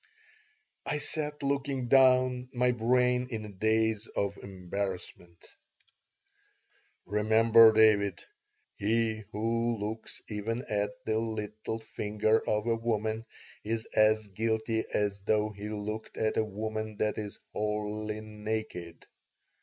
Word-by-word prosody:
I 150 Hz, -, -1 dB
sat, 150 Hz, 0 st, -3 dB
looking 140 Hz, -2 st, -1 dB
down, 130 Hz, -1 st, +4 dB
my 125 Hz, 0 st, +3 dB
brain 125 Hz, +1 st, +2 dB
in 110 Hz, -3 st, -4 dB
a -, -, -8 dB
daze 110 Hz, +2 st, +1 dB
of 100 Hz, 0 st, -2 dB
embarrassment 95 Hz, -2 st, -5 dB, 1.7 s
"Remember, 110 Hz, +2 st, +6 dB
David, 105 Hz, -4 st, +4 dB, 0.5 s
'He 110 Hz, 0 st, 0 dB
who 115 Hz, +2 st, 0 dB
looks 110 Hz, +2 st, -5 dB
even 115 Hz, +3 st, -3 dB
at 105 Hz, -3 st, 0 dB, 0.2 s
the 110 Hz, 0 st, +1 dB
little 110 Hz, 0 st, -4 dB
finger 110 Hz, 0 st, 0 dB
of 105 Hz, 0 st, +1 dB
a 115 Hz, -1 st, +1 dB
woman 110 Hz, -1 st, -1 dB, 0.4 s
is 110 Hz, +1 st, -2 dB
as 110 Hz, 0 st, +4 dB
guilty 110 Hz, +2 st, -1 dB
as 100 Hz, -1 st, 0 dB
though 105 Hz, +2 st, +1 dB
he 105 Hz, 0 st, -7 dB
looked 105 Hz, +1 st, -5 dB
at 110 Hz, 0 st, 0 dB
a -, -, +3 dB
woman 110 Hz, +1 st, -4 dB
that 105 Hz, 0 st, 0 dB
is 105 Hz, -1 st, -6 dB, 0.2 s
wholly 105 Hz, 0 st, -2 dB
naked.'" 105 Hz, -5 st, -5 dB
110 Hz, 115 wpm, -30 LUFS, 105-115 Hz, 1.7 s, Remember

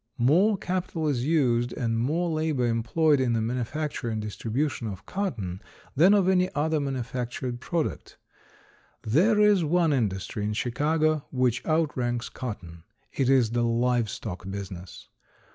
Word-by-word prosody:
More 180 Hz, -, +4 dB
capital 180 Hz, -4 st, -2 dB
is 130 Hz, -3 st, 0 dB
used 125 Hz, -7 st, +2 dB
and 115 Hz, -1 st, -1 dB
more 160 Hz, +9 st, 0 dB
labor 155 Hz, -5 st, 0 dB
employed 130 Hz, +6 st, +2 dB
in 125 Hz, -2 st, +1 dB
the 115 Hz, -, +1 dB
manufacture 125 Hz, +3 st, -3 dB
and 110 Hz, -1 st, -2 dB
distribution 115 Hz, +4 st, -2 dB
of 95 Hz, -2 st, -7 dB
cotton 110 Hz, -, -3 dB, 0.3 s
than 180 Hz, +9 st, +6 dB
of 195 Hz, -3 st, +3 dB
any 185 Hz, -1 st, +3 dB
other 155 Hz, +1 st, +1 dB
manufactured 125 Hz, -2 st, -3 dB
product. 165 Hz, +4 st, -3 dB, 0.9 s
There 185 Hz, -, +3 dB
is 210 Hz, -4 st, +5 dB
one 165 Hz, 0 st, +2 dB
industry 105 Hz, -4 st, -2 dB
in 105 Hz, +1 st, -1 dB
Chicago 155 Hz, +6 st, 0 dB
which 125 Hz, -2 st, 0 dB
out 160 Hz, -1 st, +1 dB
ranks 120 Hz, -1 st, -2 dB
cotton. 85 Hz, -9 st, -7 dB, 0.3 s
It 135 Hz, -2 st, +1 dB
is 125 Hz, -5 st, +4 dB
the 120 Hz, 0 st, 0 dB
live 120 Hz, -1 st, +1 dB
stock 95 Hz, -2 st, -6 dB
business. 95 Hz, -2 st, -8 dB
125 Hz, 145 wpm, -26 LUFS, 115-155 Hz, 0.9 s, than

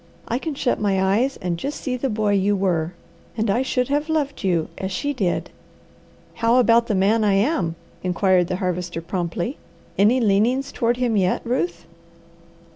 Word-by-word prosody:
I 240 Hz, -, -1 dB
can 310 Hz, 0 st, -4 dB
shut 255 Hz, -2 st, 0 dB
my 195 Hz, -2 st, +1 dB
eyes 210 Hz, +8 st, +1 dB
and 175 Hz, -2 st, -2 dB
just 285 Hz, -, -4 dB
see 255 Hz, -2 st, -2 dB
the 260 Hz, +2 st, -2 dB
boy 210 Hz, -2 st, 0 dB
you 200 Hz, +1 st, +2 dB
were, 180 Hz, -3 st, 0 dB, 0.4 s
and 220 Hz, -2 st, +1 dB
I 235 Hz, +5 st, +1 dB
should 250 Hz, -1 st, 0 dB
have 295 Hz, +2 st, 0 dB
loved 295 Hz, -5 st, -1 dB
you 175 Hz, -4 st, +1 dB
as 190 Hz, 0 st, -3 dB
she 285 Hz, +10 st, -2 dB
did." 195 Hz, -9 st, -1 dB, 0.9 s
"How 230 Hz, +1 st, +4 dB
about 235 Hz, -2 st, +4 dB
the 215 Hz, -, 0 dB
man 210 Hz, +4 st, +3 dB
I 205 Hz, -2 st, +3 dB
am?" 195 Hz, -, +1 dB, 0.3 s
inquired 185 Hz, -1 st, +2 dB
the 185 Hz, -, -2 dB
Harvester 180 Hz, -2 st, -3 dB
promptly. 175 Hz, -, -3 dB, 0.4 s
"Any 220 Hz, +6 st, +5 dB
leanings 230 Hz, +5 st, +2 dB
toward 240 Hz, +1 st, 0 dB
him 245 Hz, -3 st, 0 dB
yet, 185 Hz, -2 st, +1 dB
Ruth?" 175 Hz, -8 st, -2 dB
205 Hz, 175 wpm, -22 LUFS, 185-250 Hz, 0.9 s, Any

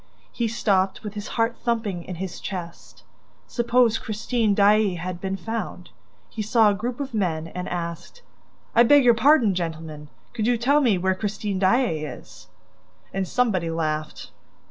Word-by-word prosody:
He 235 Hz, -, -1 dB
stopped, 195 Hz, -4 st, 0 dB
with 210 Hz, -2 st, -6 dB
his 210 Hz, 0 st, -6 dB
heart 230 Hz, +1 st, +1 dB
thumping 220 Hz, -7 st, -1 dB
in 180 Hz, -, -7 dB
his 185 Hz, +1 st, -6 dB
chest: 175 Hz, -4 st, -8 dB, 0.4 s
suppose 240 Hz, -1 st, +2 dB
Christine 220 Hz, 0 st, -1 dB
Daae 205 Hz, -1 st, +4 dB
had 175 Hz, +1 st, -5 dB
been 195 Hz, 0 st, -2 dB
found? 195 Hz, -, -5 dB, 0.4 s
He 220 Hz, -, -6 dB
saw 215 Hz, 0 st, +4 dB
a -, -, 0 dB
group 235 Hz, +5 st, -4 dB
of 275 Hz, -3 st, -5 dB
men 165 Hz, -6 st, -1 dB
and 180 Hz, +1 st, -5 dB
asked: 170 Hz, -, -6 dB, 0.5 s
"I 235 Hz, -, +6 dB
beg 280 Hz, +4 st, +6 dB
your 240 Hz, -1 st, +6 dB
pardon, 240 Hz, -3 st, +4 dB
gentlemen. 160 Hz, -3 st, -5 dB, 0.3 s
Could 220 Hz, 0 st, -1 dB
you 245 Hz, -1 st, +3 dB
tell 280 Hz, +6 st, +3 dB
me 230 Hz, -8 st, +3 dB
where 190 Hz, +1 st, +1 dB
Christine 205 Hz, 0 st, -3 dB
Daae 195 Hz, -2 st, +2 dB
is?" 150 Hz, -, -10 dB, 0.7 s
And 190 Hz, -1 st, -1 dB
somebody 195 Hz, -9 st, +1 dB
laughed. 155 Hz, -2 st, -3 dB
205 Hz, 160 wpm, -24 LUFS, 180-235 Hz, 0.7 s, I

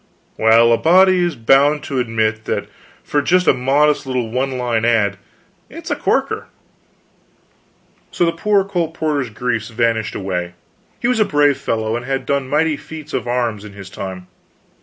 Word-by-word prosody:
"Well, 115 Hz, +1 st, +5 dB
a 115 Hz, -, +2 dB
body 185 Hz, +2 st, +5 dB
is 175 Hz, -3 st, -1 dB
bound 135 Hz, +5 st, +3 dB
to 135 Hz, -3 st, -3 dB
admit 110 Hz, -2 st, -1 dB
that -, -, -2 dB, 0.4 s
for 145 Hz, -, 0 dB
just 180 Hz, +4 st, +2 dB
a -, -, +5 dB
modest 140 Hz, +3 st, +1 dB
little 125 Hz, -4 st, -2 dB
one 130 Hz, +1 st, -1 dB
line 120 Hz, -3 st, -1 dB
ad, 110 Hz, -4 st, +2 dB, 0.5 s
it's -, -, -8 dB
a -, -, +1 dB
corker." -, -, -1 dB, 1.6 s
So 175 Hz, -, 0 dB
the 165 Hz, -, +2 dB
poor 200 Hz, +3 st, +1 dB
colporteur's 160 Hz, -7 st, -2 dB
griefs 115 Hz, 0 st, -3 dB
vanished 115 Hz, -1 st, -1 dB
away. 90 Hz, -2 st, -4 dB, 0.4 s
He 240 Hz, -, -1 dB
was 250 Hz, -2 st, +1 dB
a -, -, +6 dB
brave 145 Hz, -6 st, +2 dB
fellow, 110 Hz, 0 st, -2 dB
and 120 Hz, -, -4 dB
had 135 Hz, +1 st, -3 dB
done 140 Hz, -2 st, -1 dB
mighty 150 Hz, +1 st, +1 dB
feats 155 Hz, -1 st, -10 dB
of -, -, -2 dB
arms 120 Hz, -4 st, -1 dB
in 105 Hz, -2 st, -11 dB
his 95 Hz, -1 st, -11 dB
time. 95 Hz, -2 st, -7 dB
125 Hz, 165 wpm, -18 LUFS, 110-150 Hz, 1.6 s, a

